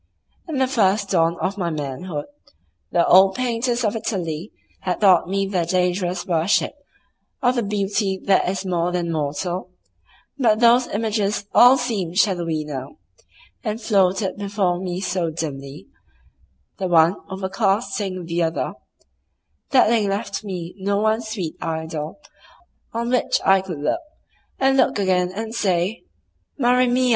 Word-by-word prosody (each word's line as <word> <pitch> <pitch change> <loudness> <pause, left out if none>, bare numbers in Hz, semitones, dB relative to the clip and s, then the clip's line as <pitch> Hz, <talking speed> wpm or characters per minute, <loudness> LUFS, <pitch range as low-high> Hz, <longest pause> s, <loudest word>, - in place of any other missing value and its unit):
In 320 - -4
the 260 0 +2
first 200 -5 +1
dawn 170 -2 +2
of 200 +2 -2
my 175 -2 0
manhood 145 +1 -4 0.7
the 170 - +3
old 190 +1 +6
painters 245 0 -1
of 210 +1 0
Italy 180 -5 -3 0.3
had 180 -1 -2
taught 185 -4 +5
me 195 +1 0
their 190 -3 0
dangerous 180 +1 0
worship 175 +1 +1 0.7
of 245 0 +4
the 245 - 0
beauty 200 -1 -1
that 190 -2 +3
is 190 +1 -3
more 175 -1 0
than 175 -1 -1
mortal, 165 +4 -3 0.7
but 220 -4 +3
those 240 +1 +5
images 210 -1 -1
all 250 +2 +8
seemed 200 -9 -2
shadowy 170 -7 +1
now, 140 - -7 0.7
and 220 -2 -2
floated 195 -3 +1
before 200 -3 -1
me 180 -1 -3
so 180 -3 -1
dimly, 140 -7 -6 0.9
the 190 - -1
one 170 +1 +5
overcasting 195 -1 -1
the 170 +1 -1
other, 165 0 -1 1.0
that 265 -5 +5
they 220 -2 +2
left 200 +2 -3
me 180 -4 -5
no 200 +1 0
one 220 +2 +1
sweet 215 -8 -4
idol 160 - -4 0.7
on 235 +1 -2
which 250 - +2
I 195 0 +5
could 185 -4 -6
look 335 - 0 0.6
and 270 0 +3
look - - +3
again 185 -2 +1
and 220 +3 -5
say, 195 - 0 0.5
"Maria 250 -1 +3
mia!" 250 +1 +2
190 Hz, 140 wpm, -22 LUFS, 175-220 Hz, 1.0 s, all